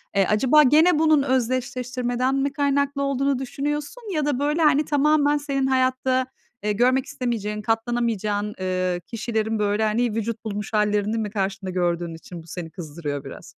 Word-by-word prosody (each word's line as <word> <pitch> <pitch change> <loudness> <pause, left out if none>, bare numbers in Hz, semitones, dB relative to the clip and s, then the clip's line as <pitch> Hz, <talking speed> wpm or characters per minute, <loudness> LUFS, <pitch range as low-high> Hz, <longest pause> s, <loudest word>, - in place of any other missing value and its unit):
eee, 195 -1 +4
acaba 265 +8 +5
gene 310 +4 +5
bunun 310 -3 +4
özdeşleştirmeden 255 0 -1
mi 275 +1 0
kaynaklı 280 0 0
olduğunu 275 -1 0
düşünüyorsun? 295 - -4
Ya 305 -3 0
da 285 -3 0
böyle, 295 +3 0
hani, 300 -1 +4
tamamen 295 0 +3
senin 275 -2 -1
hayatta, 260 0 +1 0.4
eee, 210 - +1
görmek 250 +5 +2
istemeyeceğin, 210 -4 -3
katlanamayacağın, 225 -3 -1
ııı, 185 -1 -1
kişilerin 220 +1 -2
böyle 205 +1 +1
hani 220 +1 +1
vücut 225 0 -3
bulmuş 210 0 -4
hâllerini 210 +1 +1
mi 215 -2 -2
karşında 195 -1 -3
gördüğün 175 -2 -1
için 165 0 -10
bu - - -19
seni 165 0 -6
kızdırıyor 150 -4 -5
biraz? - - -10
240 Hz, 155 wpm, -23 LUFS, 210-275 Hz, 0.4 s, acaba